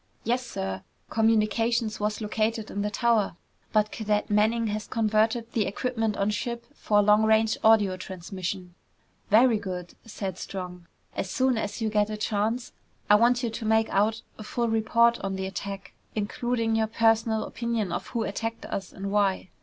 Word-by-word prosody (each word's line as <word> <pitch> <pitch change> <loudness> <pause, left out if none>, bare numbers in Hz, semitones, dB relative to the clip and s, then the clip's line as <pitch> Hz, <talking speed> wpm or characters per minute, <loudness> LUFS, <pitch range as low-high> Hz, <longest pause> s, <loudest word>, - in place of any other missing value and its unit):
"Yes, 245 +3 0
sir. 95 - -4 0.3
Communications 225 0 +2
was 210 +1 -1
located 220 +1 -1
in 200 - -2
the 210 - 0
tower, 220 -4 +1 0.4
but 215 -1 +2
Cadet 210 -2 -1
Manning 220 +3 +3
has 210 -1 -3
converted 225 +1 +1
the 220 -3 0
equipment 225 0 -1
on 200 +1 +1
ship 235 +2 -3
for 210 -7 +2
long 210 +1 +5
range 220 0 +3
audio 210 -4 +5
transmission." 185 0 -6 0.6
"Very 225 +1 +5
good!" 180 -3 -6
said 195 -5 -5
Strong. 180 -2 -7 0.3
"As 190 - -3
soon 260 +4 +2
as 220 +1 -3
you 220 - +1
get 210 0 +2
a 215 - -4
chance, 215 +3 -1 0.4
I - - +9
want 240 +3 +4
you 235 - -1
to 230 +1 -6
make 220 0 +2
out 215 +3 +1 0.2
a - - -6
full 235 +2 -1
report 230 +1 +3
on 195 0 -3
the 190 0 -3
attack, 195 0 -6 0.2
including 225 +2 -1
your 220 0 +2
personal 225 0 +2
opinion 230 -5 -2
of 175 - -3
who 235 -2 -2
attacked 225 +3 -4
us 195 -2 -5
and 195 0 -5
why." 200 -2 +1
215 Hz, 170 wpm, -27 LUFS, 200-230 Hz, 0.6 s, I